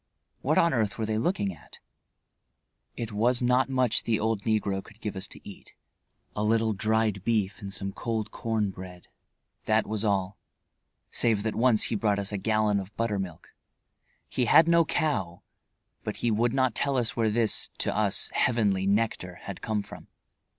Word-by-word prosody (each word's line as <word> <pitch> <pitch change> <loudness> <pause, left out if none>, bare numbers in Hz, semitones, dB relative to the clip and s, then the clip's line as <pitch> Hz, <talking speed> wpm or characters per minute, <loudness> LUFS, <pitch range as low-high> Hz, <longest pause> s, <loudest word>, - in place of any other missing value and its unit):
What 155 +4 +1
on 170 0 +4
earth 110 -5 0
were 110 - -1
they 110 0 -1
looking 110 - 0
at? - - -14 1.2
It 115 -2 -4
was 120 +4 +2
not 125 +2 +2
much 125 -4 +2
the 110 -2 0
old 110 -1 0
negro 105 -3 0
could 110 -1 -17
give 105 -2 -4
us 95 +1 -4
to - - -12
eat. 100 - -12 0.6
A 105 - -1
little 110 0 +2
dried 110 -1 0
beef 110 -2 0
and 100 -1 -6
some 100 0 -3
cold 110 -2 -3
corn 110 -3 -1
bread; 90 -1 -11 0.6
that 110 0 +2
was 105 0 -3
all, 100 -2 0 0.7
save 110 -4 +1
that 110 -1 -1
once 120 -2 +3
he - - -1
brought 105 -1 +1
us 100 0 -2
a 100 - -2
gallon 110 -1 +1
of 95 +1 -9
buttermilk. 100 -7 -3 0.7
He 125 - 0
had 160 +6 +6
no 170 -1 +5
cow, 95 - -1 0.6
but - - -4
he 120 - 0
would 115 +2 +2
not 130 -2 +1
tell 140 +3 0
us 120 -2 0
where 115 -2 +2
this, 110 -1 +2
to - - -1
us, - - +2
heavenly 100 -6 +1
nectar 100 -3 0
had 100 - -7
come 110 -2 -1
from. - - -12
110 Hz, 175 wpm, -27 LUFS, 100-115 Hz, 1.2 s, had